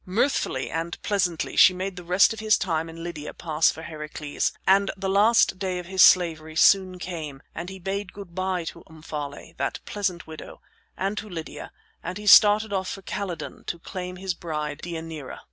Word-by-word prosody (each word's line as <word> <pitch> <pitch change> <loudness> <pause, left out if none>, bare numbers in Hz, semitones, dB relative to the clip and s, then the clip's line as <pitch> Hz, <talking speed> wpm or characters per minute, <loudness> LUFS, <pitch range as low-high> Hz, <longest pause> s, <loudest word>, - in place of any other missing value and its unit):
Mirthfully 185 - 0
and 165 +1 -3
pleasantly 180 -5 0
she 185 - +7
made 190 +1 -4
the 180 - -8
rest 180 +5 +4
of 220 - -8
his 215 -1 +3
time 165 -2 -1
in 165 0 -9
Lydia 155 -4 -6
pass 155 -1 +2
for 160 - -5
Heracles, 150 -2 -3
and 195 +1 +4
the 195 0 -3
last 200 0 +4
day 185 -2 -2
of 180 - -6
his 190 +1 +1
slavery 160 -4 +5
soon 185 +1 +4
came, 160 -6 -6
and 170 +2 -6
he 190 - -8
bade 195 +1 -4
good 195 -4 -11
by 185 -1 -1
to - - -8
Omphale, 150 -2 -7
that - - -2
pleasant 185 -5 -2
widow, 160 -1 -10 0.4
and 195 +2 -1
to 215 - -9
Lydia, 165 -4 -7 0.3
and 180 +3 -5
he 210 - -8
started 210 +1 +7
off 190 -1 -1
for 195 - -7
Calydon 180 -6 -5
to 170 - -3
claim 180 +1 -6
his 185 0 -3
bride 150 -3 -4
Deianira. 160 -4 -6
180 Hz, 185 wpm, -25 LUFS, 160-195 Hz, 0.4 s, she